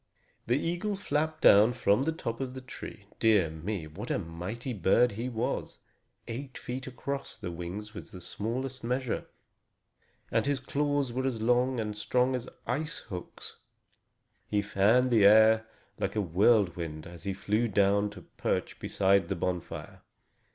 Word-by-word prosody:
The 120 +3 +3
eagle 175 +7 -1
flapped 155 -4 -1
down 105 +4 +7
from 115 -2 +2
the 155 +4 +1
top 115 -7 -4
of 130 -1 -4
the 130 - -6
tree. 110 -4 -9
Dear 105 -8 +4
me! 85 +2 -4
What 95 +10 -8
a - - +1
mighty 95 +9 -5
bird 115 +5 +3
he 115 +5 -4
was! 115 -1 -2 0.5
Eight 130 +3 -6
feet 130 +1 -5
across 140 +2 -5
the 90 - -5
wings 90 +6 -6
was 105 - -9
the 90 - -10
smallest 125 +8 -4
measure, 125 0 -1 1.0
and - - +1
his 140 -2 +1
claws 145 -1 0
were 130 +2 0
as 120 -4 -2
long 125 +2 +2
and 105 -1 -3
strong 125 +4 +1
as 125 -1 -3 0.2
ice 150 +8 -2 0.2
hooks. 90 - -8 0.9
He 105 -1 +1
fanned 110 +6 +3
the 110 -3 +5
air 110 +2 +7 0.3
like - - -1
a 105 - +2
whirlwind 90 -4 +2
as 85 +1 -11
he 100 - -1
flew 105 +5 0
down 100 0 +3
to 100 -4 -11
perch - - -3
beside 95 -2 +2
the - - 0
bonfire. 90 +1 -4
110 Hz, 160 wpm, -30 LUFS, 100-130 Hz, 1.0 s, down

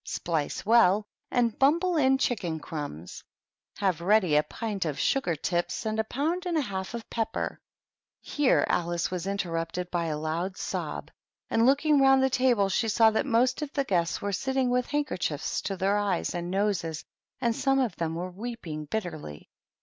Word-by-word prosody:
Splice 160 +1 -2
well 210 -2 +5 0.2
and 235 -3 +1
bumble 335 +6 +3
in 265 -3 +4
chicken 180 -12 -1
crumbs. 145 - -7 0.5
Have 185 -5 0
ready 185 -4 +3
a 150 - +6
pint 210 +3 -4
of 155 -4 -3
sugar 270 -12 +1
tips 175 +7 -2
and 220 0 -1
a - - +3
pound 320 - -2
and 340 -2 0
a - - +3
half 195 -3 -4
of 230 - -7
pepper 225 -1 -2 0.3
" - - -66 0.3
Here 290 -3 +2
Alice 170 0 0
was 180 0 -3
interrupted 175 -2 -3
by 170 -1 0
a 155 -2 -2
loud 165 +5 -3
sob, - - -4 0.4
and, 225 +2 +4
looking 290 +1 +4
round 270 0 +5
the 265 - +2
table, 245 -6 +3
she 195 +4 0
saw 220 +1 +5
that 220 - 0
most 250 +3 +2
of 295 -2 -4
the 280 - +1
guests 170 -8 0
were 200 0 -1
sitting 265 +3 0
with 250 0 +1
handkerchiefs 180 - -2
to 195 -1 -3
their 195 +3 +2
eyes 200 -4 0
and 175 0 -3
noses, 185 -5 -1 0.3
and 235 -3 +1
some 270 +1 +2
of 250 -8 0
them 165 -1 -2
were 180 +2 -4
weeping 185 -7 -6
bitterly. 155 - -5
205 Hz, 180 wpm, -28 LUFS, 170-250 Hz, 0.5 s, a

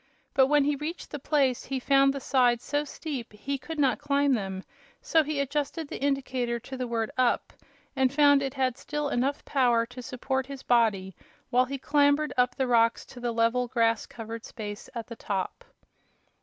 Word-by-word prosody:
But 265 -1 +5
when 295 0 +4
he 290 +1 +1
reached 305 +5 -6
the 295 - -5
place 270 -3 +1
he 270 0 -2
found 275 +1 +4
the 275 - -4
sides 250 -3 +2
so 290 +1 -1
steep 285 -4 -6
he 270 +7 -4
could 310 +5 -7
not 260 -7 +2
climb 285 -1 +2
them, 190 -4 -3 0.4
so 325 - +3
he 300 -1 -2
adjusted 290 +3 -2
the - - -7
indicator 260 -4 -1
to 265 +3 -8
the 255 -1 -3
word 230 -2 -2
"up" 250 -1 +1 0.4
and 265 -1 +2
found 285 -1 +5
it 270 0 -3
had 260 -1 0
still 295 0 -3
had 245 - 0
enough 275 +3 -1
power 240 -4 +2
to 250 +2 -10
support 260 +2 -3
his 275 -1 -8
body 210 -6 +2 0.4
while 250 +1 +4
he 275 +2 -4
clambered 285 +2 +2
up 250 -1 +2
the 265 - 0
rocks 230 -1 +3
to 250 - -12
the 240 -1 -2
level, 230 +2 +1
grass 230 -2 +1
covered 225 0 -7
space 205 -3 -7
at 230 -1 -4
the 230 - -9
top. 200 - -4
260 Hz, 195 wpm, -27 LUFS, 235-280 Hz, 0.4 s, But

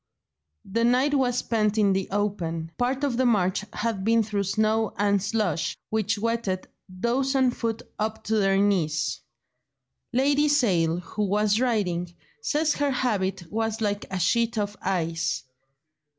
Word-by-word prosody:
The 230 +4 -1
night 255 +5 +3
was 250 -3 +2
spent 215 -3 0
in 200 -2 +4
the 190 0 -1
open; 175 -5 -2
part 255 +3 0
of 265 -5 0
the 260 - +2
march 190 -4 +2
had 220 -4 -2
been 225 +2 +3
through 205 -2 -2
snow 215 +2 +1
and 200 0 +2
slush, 200 -6 -1
which 220 -1 0
wetted 220 -4 -1 0.2
those 240 +8 0
on 260 -2 +4
foot 230 -1 -3 0.2
up 215 +1 -2
to 220 +1 0
their 195 -1 +3
knees. 180 -7 +1 0.9
Lady 280 +4 +3
Sale, 180 - +2
who 205 +5 -3
was 210 +2 +2
riding, 185 -9 0 0.3
says 300 +5 +1
her 290 -1 0
habit 200 -8 -1
was 225 0 -1
like 205 -2 -1
a 190 - -3
sheet 230 +6 +1
of 205 0 -1
ice. 165 -8 -1
215 Hz, 150 wpm, -26 LUFS, 190-235 Hz, 0.9 s, in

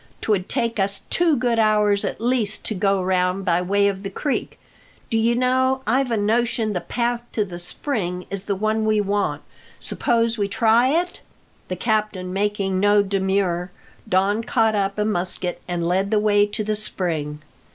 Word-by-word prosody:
'Twould 200 -3 0
take 230 -2 -1
us 195 0 0
two 335 -4 +3
good 240 -2 +1
hours 210 -2 +3
at - - -3
least 230 -3 0
to - - 0
go 195 -1 +1
round 185 +1 0
by 175 -1 +2
way 200 +2 +2
of 195 -1 -2
the 195 - -5
creek. 275 +8 -3 0.5
Do 225 - +2
you 230 +1 +2
know, 260 +1 +1
I've 255 +3 +1
a 230 - 0
notion 220 +1 +1
the 180 - -2
path 240 0 -1
to 215 - 0
the 175 -3 -8
spring 180 -2 -3
is 195 -1 -4
the 200 - -1
one 215 +2 0
we 215 -1 +3
want. 205 0 -1 0.4
Suppose 230 -3 0
we 200 - +1
try 230 +4 +3
it?" 345 +6 0 0.5
The 185 - -3
captain 210 -3 -1
making 195 -1 0
no 205 +1 +4
demur, 190 -2 0 0.4
Don 200 +4 +2
caught 225 -1 +2
up 195 -1 -1
a 210 - +1
musket 180 -3 -1
and 175 -1 -2
led 190 +3 +1
the 215 - +2
way 205 -1 +3
to 215 +1 -3
the 215 0 -1
spring. 160 -8 -3
205 Hz, 180 wpm, -22 LUFS, 190-230 Hz, 0.5 s, no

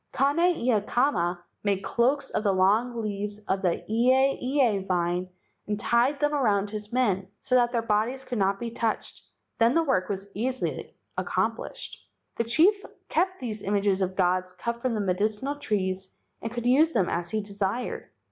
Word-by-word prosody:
Kane 280 +5 +2 0.2
ia 235 -7 +1
kama 180 -8 0 0.2
made 200 -2 0
cloaks 260 +4 +1
of - - -1
the 205 - +3
long 220 +5 +2
leaves 205 0 -3
of 190 0 0
the 180 -3 0
ieie 255 -1 +2
vine 180 0 0 0.4
and 210 0 -2
tied 240 +6 +2
them 295 0 +1
around 205 -8 +1
his 210 -1 -6
men, 205 -7 +1 0.2
so - - -3
that 240 -1 +4
their 235 -2 0
bodies 230 +4 0
could 245 -4 -4
not 195 0 +1
be 235 -1 -4
touched, 230 -1 -2 0.4
then 230 +2 +4
the 330 - +4
work 260 - +1
was 195 0 -3
easily 255 +5 -3 0.2
accomplished. - - -2 0.4
The 230 - 0
chief 360 - +4 0.3
kept 370 +3 +1
these 220 -5 -4
images 200 -1 +1
of 185 0 -1
gods 185 0 +1
cut 235 +6 -4
from 250 -2 0
the 215 - -1
medicinal 210 +9 0
trees 190 -8 -2 0.2
and 225 - -4
could 240 0 -4
use 295 +6 +4
them 195 -6 +2
as 170 0 -2
he 220 - -1
desired. 200 +3 -3
220 Hz, 170 wpm, -27 LUFS, 195-255 Hz, 0.4 s, that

